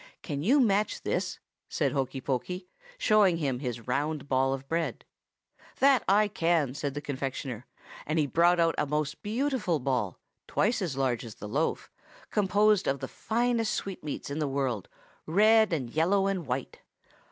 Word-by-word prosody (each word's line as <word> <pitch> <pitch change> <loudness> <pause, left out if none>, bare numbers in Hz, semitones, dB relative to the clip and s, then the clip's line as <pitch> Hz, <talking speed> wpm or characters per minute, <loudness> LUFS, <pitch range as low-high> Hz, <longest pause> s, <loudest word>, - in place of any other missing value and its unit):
"'Can 145 -4 -3
you 255 - +4
match 210 -4 +1
this?' 180 0 -1 0.3
asked 140 -4 +1
Hokey 135 -2 -2
Pokey, 150 +9 -3 0.3
showing 210 - +4
his 125 -6 -3
round 145 +3 -1
ball 135 0 +2
of 135 0 -4
bread. 165 +2 -2 0.7
"'That 270 -1 +4 0.3
can 165 -4 +2
I!' - - -6
said 145 -1 -3
the 145 - -3
confectioner; 130 -3 -4 0.4
and 155 +2 0
he 155 - +3
brought 170 +5 +3
out 165 -1 +3
a - - +1
most 150 0 -2
beautiful 235 - 0
ball, 125 - -1 0.3
twice 225 +2 +1
as 160 -8 -2
large 130 -3 0
as 115 -3 -9
the 105 - -8
loaf, 145 +10 -1 0.4
composed 210 0 +3
of 135 0 0
the - - -4
finest 230 0 0
sweetmeats 155 -7 -5
in 145 - -3
the 150 - 0
world, 135 -7 -2 0.4
red 215 +5 +5
and 130 -8 -2
yellow 185 +7 +2
and 195 -5 -1
white. 130 +1 -3
155 Hz, 160 wpm, -29 LUFS, 135-195 Hz, 0.7 s, red